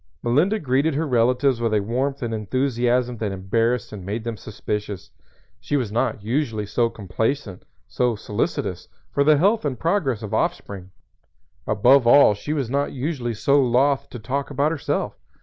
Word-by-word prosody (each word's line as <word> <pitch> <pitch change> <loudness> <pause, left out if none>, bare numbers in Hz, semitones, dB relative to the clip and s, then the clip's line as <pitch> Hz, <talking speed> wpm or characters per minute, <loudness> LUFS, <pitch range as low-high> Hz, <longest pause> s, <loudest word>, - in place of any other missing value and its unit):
Melinda 150 - +2
greeted 140 -1 +1
her 160 +3 0
relatives 125 0 +2
with 115 -2 +1
a - - +3
warmth 130 +6 -2
and 115 -1 -2
enthusiasm 125 +2 0
that 105 -2 -2
embarrassed 115 +5 -1
and 100 -3 -7
made 105 +4 -4
them 115 -1 -4
suspicious. 105 -1 -5 0.5
She 145 - -1
was 120 -7 -2
not 110 -2 -1
usually 115 -3 -1
so 115 +3 +1
complacent, 110 +1 -3 0.2
so 125 -2 0
solicitous 105 0 -3 0.2
for 140 - +2
the 150 +1 +5
health 205 +8 +2
and 140 -4 -2
progress 155 - 0
of 105 - -6
offspring; 95 -2 -2 0.8
above 120 +5 +4
all 130 -3 +7
she 105 +8 -6
was 140 -5 -1
not 140 +4 -1
usually 130 -4 -3
so 140 +6 +3
loth 135 +3 +2
to - - -8
talk 135 +5 -3
about 145 +2 +1
herself. 160 - -2
125 Hz, 165 wpm, -23 LUFS, 110-140 Hz, 0.8 s, all